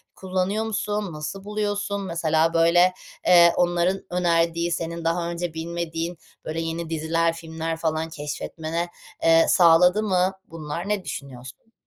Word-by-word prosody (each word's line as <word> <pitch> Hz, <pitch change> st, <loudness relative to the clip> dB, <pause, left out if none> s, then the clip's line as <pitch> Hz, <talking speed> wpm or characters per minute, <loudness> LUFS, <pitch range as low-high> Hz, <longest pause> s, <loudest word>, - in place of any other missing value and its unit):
kullanıyor 190 Hz, +3 st, -1 dB
musun? 210 Hz, -3 st, -2 dB
Nasıl 155 Hz, +6 st, -6 dB
buluyorsun? 205 Hz, -1 st, -2 dB
Mesela, 165 Hz, -3 st, +1 dB
böyle, 175 Hz, +2 st, +4 dB, 0.3 s
eee, 170 Hz, -1 st, +7 dB
onların 175 Hz, +2 st, +1 dB
önerdiği 170 Hz, -1 st, +1 dB
senin 170 Hz, 0 st, -3 dB
daha 170 Hz, +1 st, 0 dB
önce 170 Hz, -1 st, -4 dB
bilmediğin, 165 Hz, +1 st, -4 dB, 0.3 s
böyle, 160 Hz, +1 st, -3 dB
yeni 165 Hz, 0 st, -4 dB
diziler, 165 Hz, +1 st, 0 dB
filmler 165 Hz, 0 st, -5 dB
falan 160 Hz, 0 st, -1 dB
keşfetmene, 160 Hz, +3 st, -4 dB, 0.4 s
eee, 165 Hz, 0 st, +6 dB
sağladı 180 Hz, +4 st, +5 dB
mı 185 Hz, -2 st, +2 dB, 0.2 s
bunlar? 165 Hz, +3 st, -6 dB
Ne 210 Hz, -2 st, 0 dB
düşünüyorsun? 135 Hz, -, -9 dB
170 Hz, 125 wpm, -24 LUFS, 165-180 Hz, 0.4 s, eee